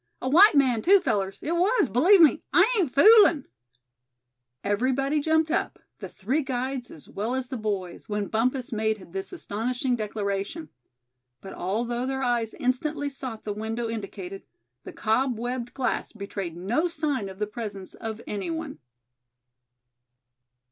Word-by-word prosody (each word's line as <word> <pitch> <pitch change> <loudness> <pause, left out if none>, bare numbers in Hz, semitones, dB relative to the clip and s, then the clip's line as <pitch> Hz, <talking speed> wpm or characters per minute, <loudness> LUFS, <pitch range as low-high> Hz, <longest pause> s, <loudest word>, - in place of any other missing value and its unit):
A - - -4
white 345 +7 +7
man, 255 -5 +3
too, 390 - +6
fellers, 195 - -1
it 310 - -2
was, 370 - +2
believe 345 - +5
me; 315 -1 +5
I 365 +4 +6
ain't 355 - +1
foolin'!" 370 - +6 1.2
Everybody 265 +8 +1
jumped 315 +1 +2
up, - - -1 0.2
the - - -7
three 245 +10 -1
guides 260 -1 -3
as 155 - -13
well 220 +6 -3
as 260 -1 -3
the 260 - -4
boys, 200 -3 -4
when 205 -1 -1
Bumpus 245 +4 -1
made 215 -5 -2
this 195 0 -5
astonishing 250 - -2
declaration. 210 +6 -3 0.7
But 195 - -10
although 235 +6 -2
their 265 0 -2
eyes 240 -3 0
instantly 290 +2 -1
sought 255 -5 -7
the 210 - -3
window 225 +3 -3
indicated, 195 -3 -6 0.4
the - - -7
cob 245 +2 0
webbed 240 +1 -4
glass 260 -2 -2
betrayed 200 -5 -6
no 235 - 0
sign 295 - -2
of 190 - -10
the 210 - -1
presence 205 -3 -7
of 225 0 -6
any 205 +5 -4
one. 320 -3 -5
245 Hz, 150 wpm, -26 LUFS, 210-285 Hz, 1.2 s, white